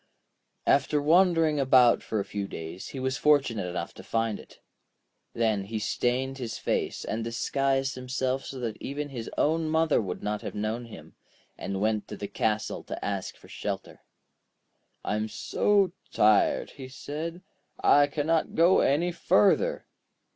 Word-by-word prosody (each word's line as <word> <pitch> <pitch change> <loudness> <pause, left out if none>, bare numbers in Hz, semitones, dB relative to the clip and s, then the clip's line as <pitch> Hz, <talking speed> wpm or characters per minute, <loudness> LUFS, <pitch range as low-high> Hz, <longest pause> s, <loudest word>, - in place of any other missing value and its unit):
After 140 +2 +3
wandering 165 -1 +4
about 130 -3 +5
for 110 - -2
a 100 - -2
few 100 -1 -4
days, 80 +2 -7
he 135 - -7
was 130 0 -1
fortunate 135 -10 +2
enough 90 0 -4
to - - -11
find 115 -2 -1
it. - - -15 0.8
Then 110 -4 +1
he 110 +2 -4
stained 125 +5 -1
his 120 -3 -4
face, - - -2
and 110 +1 -2
disguised 135 +3 0
himself 130 +1 -2
so 135 - -7
that 115 -3 -4
his 140 -4 -5
own 160 +1 +1
mother 160 -4 +3
would 95 -4 -5
not 105 0 -2
have - - -6
known 110 +3 -2
him, 115 - -12 0.4
and 95 -1 -4
went 110 0 0
to - - -7
the 100 - -5
castle 105 +1 -1
to - - -6
ask 100 -2 -3
for - - -17
shelter. - - -5 1.0
'I - - 0
am 110 +1 -1
so 200 - +1 0.2
tired,' 105 -1 +3
he 135 -2 -9
said; 160 +6 -6 0.4
'I 145 0 +6
cannot 155 +3 0
go 170 +3 +5
any 165 +6 +2
further.' 195 - +2
130 Hz, 155 wpm, -27 LUFS, 110-150 Hz, 1.0 s, I